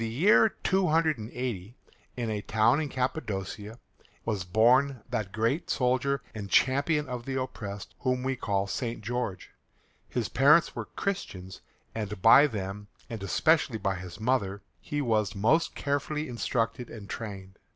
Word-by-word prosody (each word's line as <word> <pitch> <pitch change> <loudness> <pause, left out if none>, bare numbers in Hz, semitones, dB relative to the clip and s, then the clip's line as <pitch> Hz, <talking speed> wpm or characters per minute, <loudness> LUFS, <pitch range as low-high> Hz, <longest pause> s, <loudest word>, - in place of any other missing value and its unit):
GEORGE 115 - -1
In 110 - -6
the - - -5
year 210 +4 +6
280, 130 - 0 0.4
in 120 -2 -2
a 105 -1 -2
town 110 +7 +3
in 150 - -3
Cappadocia, 110 -5 -3 0.5
was 105 -5 -1
born 120 +6 +3
that 110 -6 -2
great 115 - 0
soldier 130 +2 +1
and 105 -3 -6
champion 145 - +3
of 125 -1 -5
the 135 -1 -2
oppressed 100 -6 -6
whom 125 -1 0
we 135 0 0
call 100 -5 -1
St. 115 +4 -3
George. 120 -5 -3 0.6
His 120 -4 -1
parents 150 +5 +4
were - - -4
Christians, 95 - -5 0.3
and 105 -3 -4
by 115 +9 +8
them, 105 -3 -5 0.2
and 115 -3 -5
especially 145 +4 +2
by 100 -2 -1
his 90 0 -8
mother, 110 -4 0 0.2
he 145 0 -3
was 110 -5 +1
most 115 +12 +2
carefully 145 +2 -2
instructed 120 -1 -2
and 105 -3 -9
trained. 95 -4 -7
115 Hz, 150 wpm, -28 LUFS, 105-135 Hz, 0.6 s, by